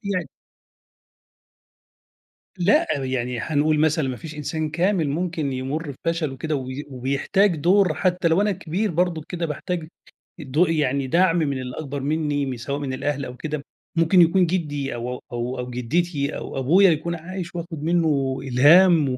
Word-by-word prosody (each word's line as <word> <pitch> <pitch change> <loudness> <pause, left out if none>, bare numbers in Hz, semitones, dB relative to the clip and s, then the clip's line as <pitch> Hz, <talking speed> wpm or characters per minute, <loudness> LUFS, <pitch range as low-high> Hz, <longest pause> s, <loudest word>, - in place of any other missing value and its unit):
يعني. 185 - -2 2.3
لأ، 185 +3 +3 0.2
يعني 125 -2 -2
حنقول 155 +2 +1
مثلًا 155 -2 +2
ما 130 - -3
فيش 155 +2 -9
إنسان 155 +1 -3
كامل 175 -1 +1
ممكن 160 -3 -2
يمُر 140 +4 -3
بفشل 160 -5 -1
كده 155 +3 -2
وي 130 +2 -5
وبيحتاج 140 +9 +1
دور، 180 +3 +3
حتى 180 +2 +1
لو 165 +4 +3
أنا 210 0 +2
كبير 190 +3 -2
برضُك 170 -2 0
كده 175 -2 -3
باحتاج 165 +2 -4 0.5
الدو 145 +6 +2
يعني 140 -5 0
دَعم 175 +4 +3
من 140 -5 0
الأكبر 135 +3 -5
منّي 145 0 -1
م 130 -2 -4
سواء 140 +4 -4
من 140 -2 -3
الأهل 140 +1 -2
أو 125 - -8
كده 150 0 -4 0.3
ممكن 165 +2 +5
يكون 180 +2 +4
جدّي 150 -6 -2
أو 120 +1 -4
أو 125 - -5
أو 120 +2 -3
أو 125 0 -4
جدّتي 140 +4 -1
أو - - -6
أبويا 180 +9 +5
يكون 165 +2 -1
عايش 180 +2 -7
وآخد 165 -3 -6
منُّه 155 -6 +1
إلهام 150 +4 +5
و 125 - -2
155 Hz, 160 wpm, -23 LUFS, 135-170 Hz, 2.3 s, ممكن